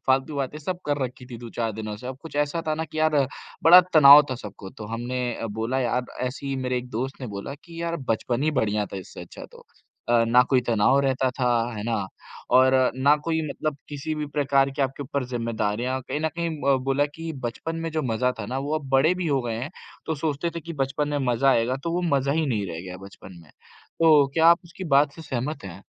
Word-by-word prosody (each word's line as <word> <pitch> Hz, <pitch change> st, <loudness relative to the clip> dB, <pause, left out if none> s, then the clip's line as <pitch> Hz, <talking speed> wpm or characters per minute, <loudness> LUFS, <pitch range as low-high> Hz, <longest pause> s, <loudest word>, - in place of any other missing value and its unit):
फ़ालतू 135 Hz, +3 st, +1 dB
बातें 140 Hz, +2 st, -3 dB
सब 175 Hz, +4 st, -4 dB
कर 145 Hz, -1 st, 0 dB
रखीं 125 Hz, 0 st, -8 dB
थीं 120 Hz, -, -7 dB
2-4 115 Hz, -1 st, -4 dB
दिनों 105 Hz, 0 st, -5 dB
से, 125 Hz, -, -10 dB
अब 130 Hz, 0 st, -5 dB
कुछ 160 Hz, -3 st, -9 dB
ऐसा 150 Hz, +3 st, 0 dB
था 155 Hz, -, +2 dB
ना 160 Hz, +1 st, -3 dB
कि 155 Hz, -, -8 dB
यार 155 Hz, -1 st, +3 dB, 0.5 s
बड़ा 175 Hz, +2 st, +10 dB
तनाव 145 Hz, -1 st, +10 dB
था -, -, -1 dB
सबको, 100 Hz, -4 st, -9 dB
तो 105 Hz, -, -9 dB
हमने 120 Hz, +3 st, -4 dB, 0.3 s
बोला 115 Hz, +5 st, -1 dB
यार 125 Hz, 0 st, 0 dB, 0.2 s
ऐसे 125 Hz, +2 st, -4 dB
ही 135 Hz, -, -2 dB
मेरे 125 Hz, -1 st, -1 dB
एक 125 Hz, -, -8 dB
दोस्त 130 Hz, +4 st, -4 dB
ने 130 Hz, -, -4 dB
बोला 100 Hz, +5 st, -6 dB
कि 170 Hz, -1 st, -8 dB
यार 170 Hz, 0 st, -2 dB
बचपन 120 Hz, +3 st, 0 dB
ही 155 Hz, -, +2 dB
बढ़िया 105 Hz, -2 st, 0 dB
था 100 Hz, -, -8 dB
इससे 95 Hz, -, -9 dB
अच्छा -, -, -10 dB
तो, -, -, -15 dB, 0.4 s
अ, 120 Hz, -1 st, +4 dB
ना 125 Hz, +1 st, +6 dB
कोई 130 Hz, -2 st, +4 dB
तनाव 115 Hz, +4 st, +4 dB
रहता 135 Hz, -1 st, +1 dB
था, 125 Hz, -1 st, -1 dB, 0.3 s
है 105 Hz, -, -4 dB
ना? 110 Hz, -4 st, -1 dB, 0.4 s
और 130 Hz, +1 st, +5 dB, 0.2 s
ना 140 Hz, +3 st, +4 dB
कोई 160 Hz, -1 st, 0 dB
मतलब 155 Hz, 0 st, -3 dB
किसी 150 Hz, +2 st, -4 dB
भी 150 Hz, -1 st, -3 dB
प्रकार 140 Hz, -2 st, +2 dB
की 140 Hz, +1 st, -2 dB
आपके 135 Hz, +1 st, -2 dB
ऊपर 140 Hz, 0 st, -3 dB
ज़िम्मेदारियाँ 120 Hz, +1 st, -2 dB
कहीं 150 Hz, -, -2 dB
न 160 Hz, -, +1 dB
कहीं 170 Hz, 0 st, -1 dB, 0.3 s
उम, -, -, +1 dB
बोला 135 Hz, +2 st, +2 dB
कि 165 Hz, 0 st, -5 dB
बचपन 140 Hz, +8 st, -4 dB
में 165 Hz, 0 st, -3 dB
जो 155 Hz, 0 st, -1 dB
मज़ा 125 Hz, +3 st, +1 dB
था 105 Hz, -, -5 dB
ना 130 Hz, +4 st, -3 dB
वो 145 Hz, +3 st, -2 dB
अब 140 Hz, -3 st, -11 dB
बड़े 135 Hz, +6 st, +4 dB
भी 180 Hz, -1 st, -3 dB
हो 140 Hz, -2 st, +2 dB
गए 115 Hz, -2 st, -3 dB
हैं 140 Hz, -, -4 dB, 0.4 s
तो 160 Hz, -, -1 dB
सोचते 150 Hz, +2 st, -2 dB
थे -, -, -3 dB
कि 170 Hz, +2 st, -8 dB
बचपन 145 Hz, +2 st, -1 dB
में 145 Hz, 0 st, -1 dB
मजा 135 Hz, +4 st, +3 dB
आएगा 125 Hz, 0 st, +2 dB
तो 170 Hz, -, -1 dB
वो 180 Hz, -, 0 dB
मजा 140 Hz, +1 st, 0 dB
ही 160 Hz, +1 st, +1 dB
नहीं 105 Hz, -7 st, -1 dB
रह 85 Hz, -2 st, -6 dB
गया 90 Hz, 0 st, -8 dB
बचपन 95 Hz, -2 st, -13 dB
में। 75 Hz, -, -19 dB
तो 155 Hz, -4 st, +1 dB
क्या 165 Hz, 0 st, +4 dB
आप 170 Hz, +1 st, +6 dB
उसकी 180 Hz, +2 st, -9 dB
बात 145 Hz, 0 st, +4 dB
से 165 Hz, -, -10 dB
सहमत 140 Hz, -2 st, -4 dB
हैं? 95 Hz, 0 st, -9 dB
135 Hz, 240 wpm, -25 LUFS, 120-150 Hz, 0.5 s, बड़ा